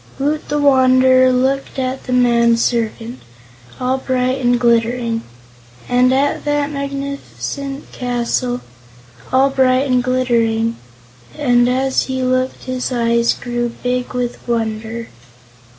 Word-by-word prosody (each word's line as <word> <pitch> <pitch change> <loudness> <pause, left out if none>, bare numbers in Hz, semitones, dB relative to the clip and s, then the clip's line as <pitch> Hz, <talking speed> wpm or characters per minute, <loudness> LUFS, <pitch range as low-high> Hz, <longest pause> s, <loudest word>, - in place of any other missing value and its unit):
Woot 295 +3 -2
the 295 - 0
Wanderer 260 -2 +5
looked 265 +2 0
at 260 0 -3
the 255 - -5
man 235 -2 +3
servant 230 +1 -2 0.6
all 255 +1 0
bright 255 0 -1
and 245 0 +3
glittering 235 -1 +1 0.7
and 250 +1 +3
at 275 +2 +1
the 290 -1 0
magnificent 280 0 -5
castle 245 0 -2 0.7
all 270 +1 +3
bright 260 0 +3
and 250 -1 +2
glittering 230 -3 +1 0.6
and 245 -4 +3
as 265 +1 +1
he 260 -1 -3
looked 255 0 -1
his 255 0 -3
eyes 235 -1 +2
grew 240 0 -3
big 250 0 -2
with 245 -1 -2
wonder. 225 0 -3
255 Hz, 120 wpm, -17 LUFS, 240-265 Hz, 0.7 s, Wanderer